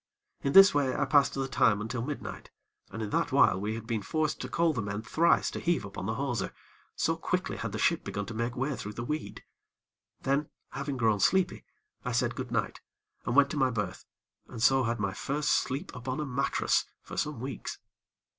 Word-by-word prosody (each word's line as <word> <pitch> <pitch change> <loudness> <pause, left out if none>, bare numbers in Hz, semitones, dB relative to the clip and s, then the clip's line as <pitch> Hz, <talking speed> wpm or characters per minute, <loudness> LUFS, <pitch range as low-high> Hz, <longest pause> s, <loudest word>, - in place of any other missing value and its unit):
In 140 - -1
this 195 0 +9
way, 140 -3 +1
I - - +1
passed 145 -3 +4
the 135 -1 -1
time 115 -6 +3
until 115 +3 -3
midnight, 145 +4 -6 0.4
and 115 - -5
in 105 - -4
that - - +1
while 95 - +4
we 105 +2 -2
had 115 -1 -7
been 115 -2 -1
forced 155 +8 -1
to - - -5
call 165 -1 +2
the 120 - -2
men 105 +1 -4
thrice 165 +8 +3
to - - -4
heave 170 -11 0
upon 100 - -6
the 110 - -1
hawser, 125 -4 -2 0.4
so - - +1
quickly - - -2
had - - -4
the - - -4
ship - - +2
begun 105 0 -4
to 115 - -7
make 115 +2 -2
way 135 +2 -1
through 105 -3 -6
the 120 - -5
weed. 150 +5 -4 0.8
Then, 140 +2 0 0.2
having 140 0 -3
grown 110 -4 +2
sleepy, 190 - +2 0.4
I - - -2
said - - +1
goodnight, - - -3 0.5
and 120 - 0
went 140 0 +5
to - - -3
my 130 -2 +3
berth, 110 -4 -3 0.4
and - - -8
so 130 +2 +4
had 115 0 -1
my 100 -2 -1
first 145 +7 -2
sleep 130 +1 0
upon 130 +2 -4
a 150 - -1
mattress, 135 0 +1 0.2
for - - -9
some 150 -5 -2
weeks. 130 +2 -5
130 Hz, 205 wpm, -29 LUFS, 115-145 Hz, 0.8 s, this